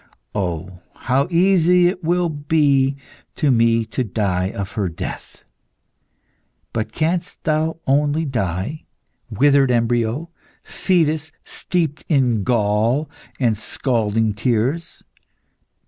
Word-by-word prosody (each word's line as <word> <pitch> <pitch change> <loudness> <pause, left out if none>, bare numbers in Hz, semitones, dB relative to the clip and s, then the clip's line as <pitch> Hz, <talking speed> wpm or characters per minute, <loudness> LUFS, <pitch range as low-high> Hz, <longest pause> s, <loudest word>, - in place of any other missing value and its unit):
Oh, 90 -2 -3 0.2
how 135 +3 0
easy 180 0 +4
it 180 0 -2
will 175 +2 +1
be 145 -3 +1 0.4
to 150 -4 +2
me 115 -1 +3
to 110 +3 -2
die 95 -4 -1
of 100 -1 -5
her 100 -5 -1
death! 85 - -7 1.3
But 110 -1 -2
canst 165 +6 -2
thou 155 +1 0
only 145 +3 +2
die, 105 - -3 0.4
withered 140 +4 +3
embryo, 120 +6 0 0.3
fetus 160 -4 0
steeped 160 -5 -2
in 125 -8 +2
gall 115 +6 +1 0.3
and 120 -4 +2
scalding 110 -1 -1
tears? 125 +9 -1
130 Hz, 100 wpm, -20 LUFS, 110-155 Hz, 1.3 s, easy